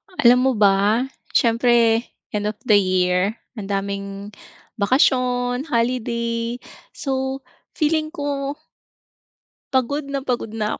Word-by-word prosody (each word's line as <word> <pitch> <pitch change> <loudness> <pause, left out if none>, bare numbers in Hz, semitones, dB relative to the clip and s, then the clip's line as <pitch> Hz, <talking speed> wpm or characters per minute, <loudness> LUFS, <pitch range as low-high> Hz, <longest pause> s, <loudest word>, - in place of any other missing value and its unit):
Alam 245 -3 +5
mo - - +4
ba 205 +3 +3 0.3
siyempre 230 -1 +4 0.3
end 210 -1 -2
of 210 - -3
the 210 -5 +5
year 185 +1 +1 0.2
ang 195 - -6
daming 200 0 -4 0.5
bakasyon, 250 +2 +2
holiday, 235 -3 -1 0.4
so 265 0 -3 0.3
feeling 310 0 +1
ko 285 -2 -3 1.2
Pagod 275 +3 0
na 275 -1 -3
pagod 250 -4 -2
na 215 -1 -2
235 Hz, 105 wpm, -21 LUFS, 205-265 Hz, 1.2 s, Alam